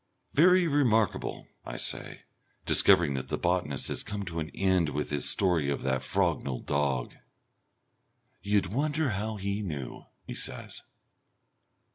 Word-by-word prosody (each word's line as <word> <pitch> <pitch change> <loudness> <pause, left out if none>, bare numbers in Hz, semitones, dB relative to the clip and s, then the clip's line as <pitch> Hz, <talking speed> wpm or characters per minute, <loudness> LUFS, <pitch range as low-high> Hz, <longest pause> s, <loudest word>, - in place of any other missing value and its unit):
"Very 180 +4 +6
remarkable," 120 - +1 0.2
I - - -6
say, - - -4 0.4
discovering 80 -5 +5
that 65 -1 -4
the - - -2
botanist 85 -6 0
has - - -1
come 100 -1 -5
to 85 -2 -4
an 80 - -3
end 95 -4 +1
with 75 +1 -3
his 70 -3 +1
story 85 -7 +2
of 70 - -2
that 65 -1 0
Frognal 65 -3 -1
dog. 70 -4 0 1.3
"You'd 100 -2 +1
wonder 150 +2 +1
how 105 +2 -2
he 100 +1 -2
knew," 75 -10 -5 0.2
he - - -6
says. - - -4
90 Hz, 135 wpm, -29 LUFS, 70-105 Hz, 1.3 s, Very